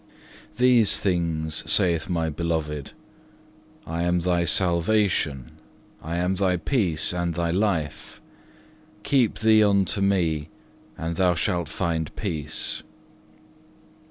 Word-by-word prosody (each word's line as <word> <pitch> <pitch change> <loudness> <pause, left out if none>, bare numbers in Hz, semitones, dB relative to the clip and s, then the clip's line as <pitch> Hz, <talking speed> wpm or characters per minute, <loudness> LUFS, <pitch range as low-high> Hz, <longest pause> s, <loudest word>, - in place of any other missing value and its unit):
2. 125 - -1
These 120 -4 +5
things 80 -4 -1
saith 85 -3 +2
thy 85 -3 -1
Beloved, 75 -2 -3 0.9
"I 80 +1 -3
am 85 0 +1
thy 85 0 +1
salvation, 85 - +1 0.5
I 85 +2 -4
am 90 +2 0
thy 95 -1 +1
peace 85 - 0
and 85 -2 -2
thy 85 -1 0
life. 85 -6 -2 0.8
Keep 130 -3 +2
thee 110 -1 +5
unto 100 -1 +2
Me, 85 -6 +1 0.5
and 80 0 -4
thou 90 -2 +3
shalt 85 -1 -1
find 80 -2 -2
peace." 80 -7 -4
85 Hz, 110 wpm, -24 LUFS, 80-95 Hz, 0.9 s, These